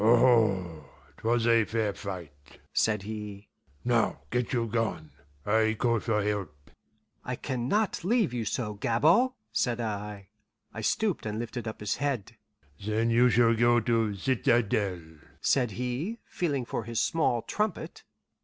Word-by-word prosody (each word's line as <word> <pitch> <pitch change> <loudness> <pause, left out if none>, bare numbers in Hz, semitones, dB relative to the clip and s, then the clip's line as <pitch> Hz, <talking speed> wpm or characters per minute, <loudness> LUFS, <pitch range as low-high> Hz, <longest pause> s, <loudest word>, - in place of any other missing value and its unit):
"Aho! 110 -9 +4 0.3
'twas 115 0 +1
a 115 -1 +5
fair 110 -1 -1
fight," 85 - -9
said 105 -3 +1
he. 105 -1 -7 0.4
"Now - - +1
get 125 -1 0
you 120 -3 +1
gone. 110 -9 -2 0.3
I 110 +1 +2
call 115 0 +2
for 105 -1 0
help." 95 -9 -4 0.5
"I 125 - -3
can 125 -2 -3
not 210 +1 0
leave 210 - +2
you 120 -2 -1
so, 105 0 -2
Gabord," 160 - +3 0.2
said 120 -2 0
I. 105 -3 -4 0.4
I 115 - -5
stooped 195 - 0
and 105 0 -3
lifted 120 +1 -4
up 110 - -6
his 105 - -1
head. 140 -7 -2 0.5
"Then 110 +3 +1
you 120 +2 +5
shall 115 +1 +4
go 120 +1 +4
to 115 -2 +1
citadel," 105 -4 +1 0.4
said 125 -4 +2
he, 125 - -3
feeling 145 -8 -2
for 115 - -4
his 115 -1 -2
small 125 -8 +1
trumpet. 210 -4 -3
115 Hz, 145 wpm, -28 LUFS, 105-125 Hz, 0.5 s, a